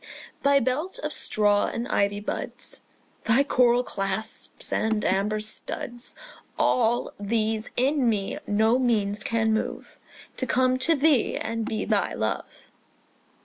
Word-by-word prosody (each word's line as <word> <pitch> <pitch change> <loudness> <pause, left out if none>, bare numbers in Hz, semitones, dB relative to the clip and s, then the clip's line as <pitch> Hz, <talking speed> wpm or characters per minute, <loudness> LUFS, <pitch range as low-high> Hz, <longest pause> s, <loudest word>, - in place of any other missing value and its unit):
Thy 280 0 +4
belt 300 - -2
of - - -2
straw 205 -1 +2
and 235 +1 -3
ivy 200 0 +1
buds, 205 - -3 0.4
Thy 240 +5 +4
coral 250 -3 +3
clasps 195 -1 -2
and 220 -1 0
amber 200 +3 +1
studs, 240 +3 -7 0.4
All 240 0 +2
these 220 +1 -1
in 265 0 +2
me 205 -3 -1
no 220 +4 +3
means 210 -5 +1
can 225 -1 +1
move 220 - -4 0.4
To 260 - -1
come 255 +1 +2
to 325 +6 +3
thee 285 -3 +2
and 225 0 -3
be 215 - -2
thy - - 0
love. - - -4
225 Hz, 130 wpm, -26 LUFS, 210-255 Hz, 0.4 s, Thy